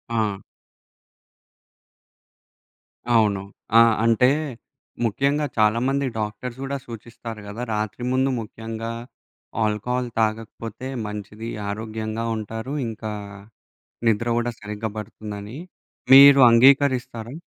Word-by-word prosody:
ఆ! 105 -3 0 2.8
అవును. 105 -3 +3 0.4
ఆ! - - +9 0.2
అంటే 115 +2 +4 0.8
ముఖ్యంగా 140 +7 +1
చాలా 110 +1 +3
మంది 140 0 0
డాక్టర్స్ 115 +4 -5
గూడా 140 +1 -3
సూచిస్తారు 115 -1 -9
గదా! 110 +4 -6
రాత్రి 105 +2 -3
ముందు 130 +1 +2
ముఖ్యంగా 115 +1 -6 0.7
ఆల్కహాల్ 120 +4 -1
తాగకపోతే 110 +2 -3 0.2
మంచిది 105 +2 -7 0.2
ఆరోగ్యంగా 110 +1 -4
ఉంటారు. 110 +4 -5
ఇంకా 110 -1 -5 1.0
నిద్ర 115 +2 +1
గూడా 120 0 0
సరిగ్గా 105 +1 -5
బడుతుందని 105 +2 -7 0.6
మీరు 140 0 +10
అంగీకరిస్తారా? 125 -1 +3
115 Hz, 90 wpm, -23 LUFS, 105-125 Hz, 2.8 s, మీరు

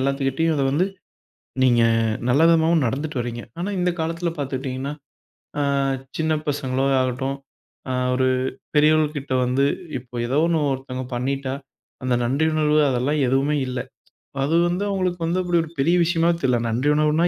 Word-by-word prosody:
எல்லாத்துகிட்டயும் 140 +4 0
அத 140 - +1
வந்து 165 +7 +2 0.8
நீங்க 120 -2 +4 0.5
நல்ல 135 +5 +4
விதமாவும் 165 -1 +4
நடந்துட்டு 140 +3 -2
வர்றீங்க. 120 0 -5 0.2
ஆனா 180 +4 -2
இந்தக் 180 -1 0
காலத்துல 165 +1 -1
பாத்துக்கிட்டீங்கன்னா, 135 0 -3 0.7
ஆ, - - +2 0.6
சின்னப் 155 -1 0
பசங்களோ 135 -2 -1
ஆகட்டும், 130 +2 -1 0.5
அ, - - 0 0.2
ஒரு 130 0 +2 0.5
பெரியவங்ககிட்ட 150 -2 +2
வந்து 130 +3 +2 0.3
இப்போ 125 0 -16
எதாவது 140 +6 +2
ஒண்ணு 165 -2 +2
ஒருத்தங்க 130 -1 -5
பண்ணிட்டா, 135 +2 -2 0.5
அந்த 130 -1 +1
நன்றி 140 +6 +1
உணர்வு 155 -1 +3
அதெல்லாம் 135 +4 0
எதுவுமே 135 +3 +2
இல்ல. 125 0 -3 0.7
அது 150 +4 +1
வந்து 180 +3 -1
அவங்களுக்கு 185 -3 -1
வந்து 180 +3 +1
அப்படி 175 -1 +2
ஒரு 160 - -10
பெரிய 165 +6 +3
விஷயமாவே 170 0 +2
தெரியல. 125 -2 +2
நன்றி 125 +6 0
உணர்வுன்னா 155 +3 +3
145 Hz, 145 wpm, -22 LUFS, 130-160 Hz, 0.8 s, நீங்க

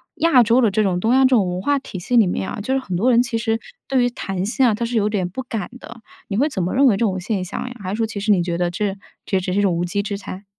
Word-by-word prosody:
亚 325 -6 +4
洲 235 +3 +3
的 230 - +4
这 215 +2 +2
种 185 -3 0
东 225 +6 +1
亚 265 - +5
这 - - +5
种 235 -7 +3
文 180 +1 -3
化 285 +8 +1
体 205 -7 -8
系 220 +8 -2
里 225 -5 +6
面 185 +1 -2
啊， - - -5
就 260 +6 -2
是 270 - +2
很 200 -9 -5
多 220 +9 +2
人 235 0 +5
其 245 -2 -2
实 225 0 -1 0.3
对 260 -2 +2
于 245 - +2
谈 195 -5 -4
薪 255 +5 +1
啊， 235 - +4
他 235 +3 -2
是 235 +1 -4
有 210 -2 +2
点 195 -4 -1
不 190 +9 -6
敢 225 -6 -4
的， 235 -2 -12 0.3
你 200 - -3
会 280 +6 +3
怎 205 - -3
么 180 - -2
认 275 +2 +4
为 240 -6 +5
这 - - -5
种 190 -3 -1
现 195 0 -2
象 185 - -5
呀？ 250 - -8
还 185 - -5
是 195 - -2
说 225 - +1
其 215 -2 -6
实 210 +2 +1
你 190 -3 +4
觉 170 -1 -2
得 175 0 0
这 195 +2 -2 0.3
这 195 - 0
也 - - -1
只 185 - -3
是 200 - +1
一 - - +3
种 195 -3 +2
无 170 - -1
稽 180 +3 -1
之 200 0 -4
谈。 195 0 -9
210 Hz, 370 characters per minute, -21 LUFS, 185-245 Hz, 0.3 s, 里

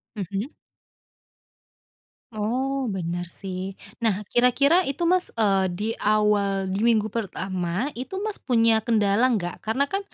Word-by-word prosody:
Mhm. 200 - -4 1.8
Oh 255 +5 -1
benar 175 -1 -3
sih 185 +1 -6 0.2
nah 215 -3 0
kira-kira 280 +9 +4
itu 280 +5 -2
Mas, 360 +1 +3
eee, 195 -4 +3
di 210 +4 -3
awal 205 -2 +2
di 195 - -1
minggu 220 -2 +2
pertama 190 - -2
itu 260 +8 -7
Mas 430 -1 -3
punya 230 -3 +3
kendala 220 0 +2
enggak? 195 -8 -2
Karena 225 +6 0
kan, 390 - +1
215 Hz, 125 wpm, -24 LUFS, 195-250 Hz, 1.8 s, kira-kira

